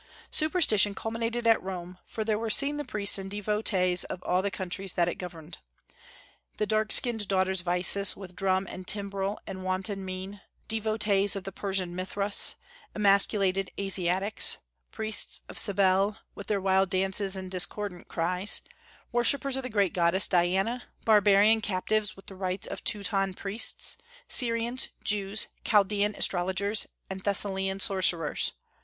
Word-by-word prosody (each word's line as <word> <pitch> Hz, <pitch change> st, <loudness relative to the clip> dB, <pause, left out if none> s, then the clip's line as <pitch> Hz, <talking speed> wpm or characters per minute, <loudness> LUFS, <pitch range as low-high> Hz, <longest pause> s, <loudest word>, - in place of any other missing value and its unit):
Superstition 265 Hz, -, +3 dB
culminated 230 Hz, +2 st, -3 dB
at 225 Hz, -1 st, +4 dB
Rome, 180 Hz, -1 st, -7 dB
for 220 Hz, -, -4 dB
there 215 Hz, -1 st, 0 dB
were 225 Hz, 0 st, -3 dB
seen 280 Hz, +6 st, +3 dB
the 295 Hz, -, -3 dB
priests 205 Hz, -6 st, -1 dB
and 195 Hz, 0 st, -6 dB
devotees 200 Hz, -3 st, 0 dB
of 180 Hz, -, -7 dB
all 180 Hz, +1 st, +1 dB
the 200 Hz, -, -1 dB
countries 190 Hz, 0 st, -2 dB
that 170 Hz, -1 st, +1 dB
it 175 Hz, -, -4 dB
governed, 170 Hz, -2 st, -9 dB, 1.0 s
"the 210 Hz, -, 0 dB
dark 215 Hz, 0 st, 0 dB
skinned 225 Hz, -4 st, +2 dB
daughters 190 Hz, -1 st, +1 dB
of 175 Hz, -, -18 dB
Isis, 180 Hz, +3 st, +3 dB
with 185 Hz, -2 st, -10 dB
drum 190 Hz, 0 st, +1 dB
and 185 Hz, 0 st, -8 dB
timbrel 200 Hz, 0 st, -1 dB
and 190 Hz, -1 st, -7 dB
wanton 190 Hz, +1 st, -3 dB
mien; 190 Hz, +1 st, -7 dB, 0.3 s
devotees 215 Hz, -3 st, +1 dB
of 195 Hz, -, -5 dB
the 195 Hz, -, -6 dB
Persian 190 Hz, -2 st, -3 dB
Mithras; 200 Hz, +2 st, 0 dB, 0.4 s
emasculated 195 Hz, -2 st, +3 dB
Asiatics; 195 Hz, +1 st, +3 dB, 0.3 s
priests 220 Hz, -1 st, -3 dB
of -, -, -2 dB
Cybele, 200 Hz, 0 st, +2 dB, 0.2 s
with 200 Hz, -, -9 dB
their 205 Hz, -2 st, 0 dB
wild 190 Hz, 0 st, +2 dB
dances 195 Hz, +1 st, +1 dB
and 185 Hz, -1 st, -7 dB
discordant 185 Hz, 0 st, -1 dB
cries; 180 Hz, +4 st, 0 dB, 0.5 s
worshippers 265 Hz, +3 st, +2 dB
of 265 Hz, -, -2 dB
the 255 Hz, -, -6 dB
great 200 Hz, -5 st, +1 dB
goddess 175 Hz, +2 st, +3 dB
Diana; 190 Hz, +7 st, +1 dB, 0.2 s
barbarian 210 Hz, 0 st, +5 dB
captives 210 Hz, +2 st, -1 dB
with 195 Hz, -, -16 dB
the -, -, -9 dB
rites 185 Hz, 0 st, -3 dB
of -, -, -7 dB
Teuton 195 Hz, -2 st, +1 dB
priests; 200 Hz, +4 st, -3 dB, 0.3 s
Syrians, 235 Hz, +1 st, 0 dB
Jews, 210 Hz, -2 st, +1 dB, 0.2 s
Chaldaean 205 Hz, 0 st, +2 dB
astrologers, 190 Hz, +3 st, +1 dB, 0.2 s
and 190 Hz, 0 st, -6 dB
Thessalian 195 Hz, -1 st, 0 dB
sorcerers.... 185 Hz, -6 st, +3 dB
195 Hz, 145 wpm, -28 LUFS, 185-210 Hz, 1.0 s, barbarian